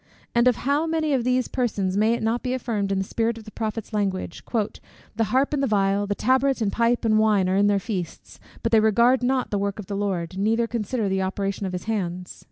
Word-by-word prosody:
And 235 +1 +4
of 250 - +4
how 285 +5 0
many 320 -2 0
of 255 -3 +1
these 255 0 +1
persons 205 -7 -1
may 215 +3 +3
it - - -5
not 225 +2 0
be 255 0 -1
affirmed 215 -6 -2
in 195 - +1
the 190 - 0
spirit 230 +3 -1
of 225 - -10
the 215 - -11
prophet's 220 0 -4
language: 195 -4 -2 0.7
"The 225 +1 +1
harp, 265 +6 +1
and 285 - 0
the 275 - +1
viol, 200 -1 +1
the 205 - -1
tabret 260 +4 +2
and 210 -3 0
pipe, 235 +2 +1
and 215 -1 +4
wine, 210 -4 +3
are 185 - +1
in 200 +1 +4
their 205 -1 +3
feasts: 195 -5 -5 0.2
but 230 - 0
they 225 - +6
regard 235 +4 +4
not 255 0 0
the 205 - 0
work 200 0 -2
of 210 - -7
the 200 - -5
Lord, 190 -3 -2
neither 225 +3 +2
consider 230 -1 -2
the 190 0 0
operation 195 +1 -2
of 185 - -5
his 180 - -4
hands?" 180 -5 -4
215 Hz, 240 wpm, -24 LUFS, 195-240 Hz, 0.7 s, they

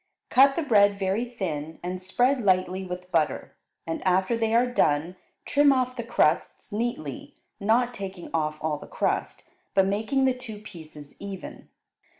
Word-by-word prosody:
Cut 275 +1 +6
the 335 - 0
bread 205 -6 +4
very 195 +4 0
thin 165 -10 -5
and 180 +1 -4
spread 245 +8 +1
lightly 185 -2 +1
with 180 0 -7
butter, 160 -3 0 0.3
and 165 - -4
after 185 +5 +2
they 225 0 0
are 240 +2 +5
done 170 -8 +1 0.3
trim 290 0 +4
off 255 -1 +1
the 240 - -3
crusts 180 -8 0
neatly, 210 - -4 0.2
not 235 +4 +2
taking 195 -4 -7
off 155 -1 0
all 155 -2 -1
the - - -11
crust, - - -2 0.3
but 195 -1 +5
making 220 +8 +1
the 260 - +3
two 250 -4 -8
pieces 160 -8 -11
even. 195 -2 -8
200 Hz, 155 wpm, -26 LUFS, 180-240 Hz, 0.3 s, Cut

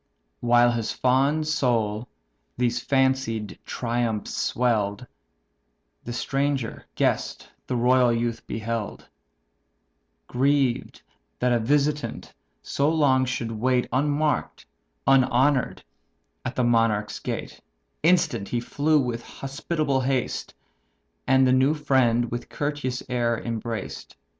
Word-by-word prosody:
While 120 0 +4
his 115 -2 -2
fond 140 +5 +2
soul 120 -7 0 0.5
these 120 -1 +1
fancied 130 -6 0
triumphs 115 -3 -2
swell'd, 110 -3 0 1.0
The 120 - -5
stranger 135 -1 -2
guest - - -1 0.2
the 125 - -1
royal 125 0 +4
youth 115 0 -2
beheld; 110 -1 -4 1.2
Grieved 135 -1 0 0.3
that 125 0 +1
a 120 - +2
visitant 145 +5 0 0.3
so 140 +2 0
long 140 -5 +3
should 120 -2 -3
wait 125 +3 +1
Unmark'd, 145 +3 0 0.4
unhonour'd, 135 0 +3 0.6
at 130 - -4
a 125 - +2
monarch's 115 -3 +1
gate; - - -5 0.4
Instant 160 - +2
he 120 - 0
flew 150 +5 +1
with 120 -3 -2
hospitable 140 +2 -2
haste, 130 -1 -2 0.7
And 130 0 +5
the 130 - +4
new 135 +4 +3
friend 125 -5 +2
with 120 +1 -5
courteous 145 -4 -3
air 120 -2 0
embraced. 115 -2 -5
125 Hz, 105 wpm, -25 LUFS, 115-135 Hz, 1.2 s, And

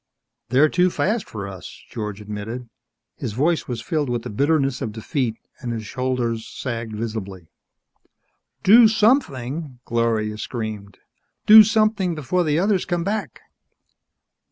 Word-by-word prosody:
"They're 135 +5 +5
too 180 +3 +2
fast 210 +4 -1
for 100 -2 -6
us," 95 -2 -10
George 105 -2 -5
admitted. 105 +4 -6 0.5
His - - -4
voice 155 +8 +1
was 120 -2 -4
filled 155 -6 -1
with 120 -1 -2
the - - -6
bitterness 140 +2 +1
of 110 - -3
defeat 115 +1 -2 0.2
and 120 - -4
his 110 -2 -4
shoulders 125 -2 -2
sagged 115 -4 -5
visibly. 105 -5 -5 1.2
"Do 225 +4 +8
something!" 155 - 0
Gloria 110 -2 0
screamed. 110 -5 -5 0.5
"Do 215 +1 +10
something 215 -4 +1
before 155 +5 0
the 150 -2 +1
others 195 +1 +2
come 175 -1 -2
back!" 210 +3 -3
125 Hz, 130 wpm, -22 LUFS, 110-175 Hz, 1.2 s, Do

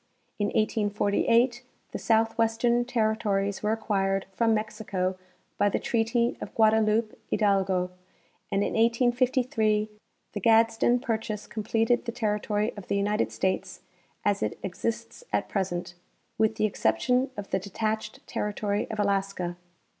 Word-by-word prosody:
In 205 - +1
1848 220 +3 +2 0.3
the - - -4
southwestern 225 +1 +2
territories 215 -4 0
were 210 - +1
acquired 195 -3 0
from 225 +3 +2
Mexico 210 -4 -1 0.4
by 205 - +4
the - - 0
treaty 235 +1 +1
of - - -7
Guadaloupe 220 0 +3
Hidalgo: 190 -3 +1 0.6
and 200 0 +2
in - - -2
1853 230 -2 +2 0.4
the 205 - -3
Gadsden 225 +3 +4
purchase 220 -3 -3
completed 225 +3 0
the 235 - -2
territory 210 -1 -1
of 205 -3 -9
the 200 - 0
United 210 +2 0
States 190 0 -2 0.4
as 205 -1 +2
it 105 - -2
exists 220 - -4
at - - 0
present, 175 -3 -2 0.5
with 220 0 +3
the 215 -1 +1
exception 230 - +1
of 205 -1 -7
the - - +2
detached 215 +3 -3
territory 210 0 -2
of 215 - -5
Alaska. 195 -3 0
215 Hz, 125 wpm, -27 LUFS, 200-225 Hz, 0.6 s, by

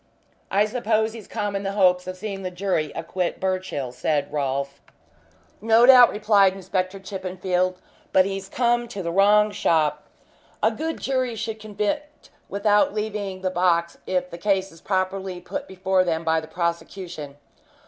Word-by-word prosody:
"I 200 +2 +3
suppose 220 -1 0
he's 225 -4 -10
come 205 -1 -3
in 195 - -1
the 195 0 -3
hopes 180 -2 +3
of 185 0 -5
seeing 195 -1 -5
the 185 - -3
jury 180 -4 -1
acquit 175 +2 -3
Birchill," 185 -9 -2
said 145 +4 -1
Rolfe. 140 -1 -2 0.8
"No 225 +2 +5
doubt," 250 -2 +9
replied 205 -2 +3
Inspector 190 0 -3
Chippenfield. 185 -1 -2 0.3
"But 185 - +5
he's 195 0 -4
come 240 0 +1
to 200 -5 -6
the 170 - -2
wrong 210 +3 +4
shop. 155 -6 +1 0.6
A - - +4
good 320 +1 -4
jury 255 -3 -1
should 220 0 -4
convict 215 +9 -4 0.2
without 205 +1 +2
leaving 205 -3 -3
the 185 -1 -1
box 170 -1 +1
if 180 -1 -1
the 170 - -8
case 195 -1 0
is 165 - -17
properly 190 -1 -2
put 285 +11 -6
before 190 0 +1
them 165 -2 -1
by 160 0 +2
the 155 - -10
prosecution. 170 -3 -4
190 Hz, 160 wpm, -24 LUFS, 180-210 Hz, 0.8 s, doubt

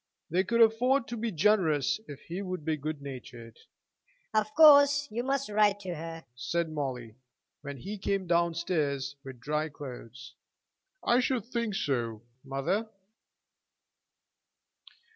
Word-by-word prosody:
They 180 +3 +3
could 230 +4 +1
afford 230 +3 +4
to 240 - -3
be 230 0 -2
generous 165 -4 +2
if 145 -2 -9
he 175 +4 -6
would 185 -5 -5
be 160 -1 +1
good 155 0 -5
natured. 125 -4 -9 0.7
"Of 215 0 +1
course 290 -2 +7
you 235 +3 -2
must 275 +1 0
write 210 -1 +3
to 185 -3 -4
her," 165 0 -7
said 160 +7 -2
Molly, 130 -7 -4 0.5
when 140 -1 -7
he 200 - -6
came 195 0 -1
down 170 -1 +2
stairs 145 -5 -1
with 130 -3 -9
dry 150 +5 -1
clothes. 130 -3 -10 0.7
"I 240 - +4
should 250 -3 0
think 235 -4 -2
so, 115 - -2 0.2
mother." 140 +11 -1
170 Hz, 135 wpm, -29 LUFS, 140-215 Hz, 0.7 s, course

